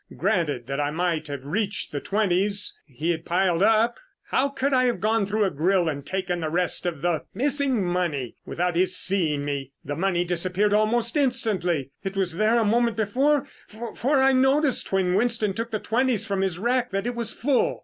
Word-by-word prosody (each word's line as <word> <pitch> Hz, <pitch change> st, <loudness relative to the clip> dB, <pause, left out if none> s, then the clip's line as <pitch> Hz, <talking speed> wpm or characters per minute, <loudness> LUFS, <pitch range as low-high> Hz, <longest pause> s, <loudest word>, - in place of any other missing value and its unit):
Granted 165 Hz, -, 0 dB
that 135 Hz, +3 st, -4 dB
I 145 Hz, 0 st, 0 dB
might 165 Hz, 0 st, -1 dB
have 140 Hz, -2 st, -6 dB
reached 200 Hz, +7 st, -2 dB
the 145 Hz, -, -3 dB
twenties 200 Hz, +2 st, +1 dB
he 150 Hz, +5 st, -2 dB
had 165 Hz, -1 st, -3 dB
piled 180 Hz, -1 st, +1 dB
up, 225 Hz, +3 st, +3 dB, 0.3 s
how 275 Hz, +2 st, +2 dB
could 275 Hz, 0 st, -1 dB
I 255 Hz, -1 st, +4 dB
have 245 Hz, -2 st, 0 dB
gone 220 Hz, -1 st, +1 dB
through 210 Hz, +2 st, +1 dB
a 195 Hz, -, +1 dB
grill 175 Hz, +4 st, +1 dB
and 140 Hz, -3 st, -3 dB
taken 180 Hz, +2 st, -2 dB
the 160 Hz, -2 st, -2 dB
rest 180 Hz, +2 st, 0 dB
of 160 Hz, -5 st, -4 dB
the 175 Hz, -3 st, 0 dB
missing 270 Hz, -3 st, +1 dB
money 170 Hz, -8 st, -2 dB
without 175 Hz, 0 st, -2 dB
his 185 Hz, +2 st, +2 dB
seeing 160 Hz, -7 st, +1 dB
me? 140 Hz, -2 st, -4 dB
The 145 Hz, -, -3 dB
money 175 Hz, +1 st, 0 dB
disappeared 180 Hz, +4 st, 0 dB
almost 225 Hz, +3 st, +2 dB
instantly. 200 Hz, -, 0 dB
It 195 Hz, 0 st, -4 dB
was 185 Hz, -3 st, 0 dB
there 215 Hz, +3 st, +3 dB
a 230 Hz, -, +2 dB
moment 230 Hz, +1 st, +2 dB
before, 270 Hz, +7 st, +1 dB, 0.5 s
for 275 Hz, +3 st, +1 dB
I 265 Hz, 0 st, +4 dB
noticed 265 Hz, +1 st, +2 dB
when 190 Hz, -2 st, +1 dB
Winston 220 Hz, -1 st, +1 dB
took 230 Hz, +3 st, -4 dB
the 220 Hz, -, -2 dB
twenties 235 Hz, 0 st, 0 dB
from 200 Hz, -3 st, -1 dB
his 190 Hz, -3 st, -1 dB
rack 245 Hz, +4 st, 0 dB
that 195 Hz, 0 st, -2 dB
it 245 Hz, -, -1 dB
was 235 Hz, -2 st, -1 dB
full." 265 Hz, +1 st, 0 dB
195 Hz, 195 wpm, -24 LUFS, 175-235 Hz, 0.5 s, I